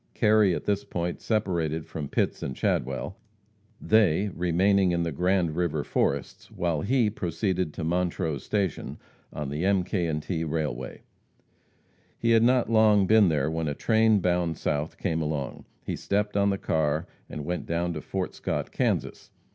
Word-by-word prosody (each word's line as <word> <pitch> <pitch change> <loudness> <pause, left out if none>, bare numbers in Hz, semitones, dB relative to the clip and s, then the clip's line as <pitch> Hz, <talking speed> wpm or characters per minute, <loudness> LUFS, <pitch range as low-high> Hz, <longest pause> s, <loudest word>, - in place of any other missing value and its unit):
Kerry 105 -4 +4
at - - -6
this 100 -1 0
point 85 0 -4
separated 85 -8 -1
from 75 -3 -5
Pitts - - -1
and 65 - -4
Chadwell, 65 - -2 0.6
they 105 -2 +3
remaining 90 +2 +2
in 85 0 +1
the 85 - -2
Grand 90 +1 +1
river 85 -2 0
forests, 70 -1 -2
while 85 -4 -1
he 125 - +2
proceeded 90 -2 -2
to 85 - -4
Montrose 85 -3 -1
station, 100 -5 -2 0.3
on 75 -2 -5
the 75 +4 -3
M., 95 -1 +3
K. 90 -3 -1
& - - -9
T. 80 0 -3
railway. 75 -6 -3 1.1
He 115 - +1
had 115 -1 +5
not 125 +1 +3
long 110 -3 +4
been 105 -1 +5
there 75 -1 0
when 80 -1 -2
a 75 - -2
train 110 0 +3
bound 85 -2 0
south 75 +2 -2
came 80 -4 -1
along. 75 -4 -3 0.2
He - - -3
stepped 105 +1 -1
on 100 0 +3
the 100 - 0
car 80 -2 0 0.2
and 75 - -6
went 90 +2 -3
down 85 +1 -1
to 75 - -5
Fort - - -3
Scott, - - -3
Kansas. - - -1
85 Hz, 165 wpm, -27 LUFS, 80-100 Hz, 1.1 s, had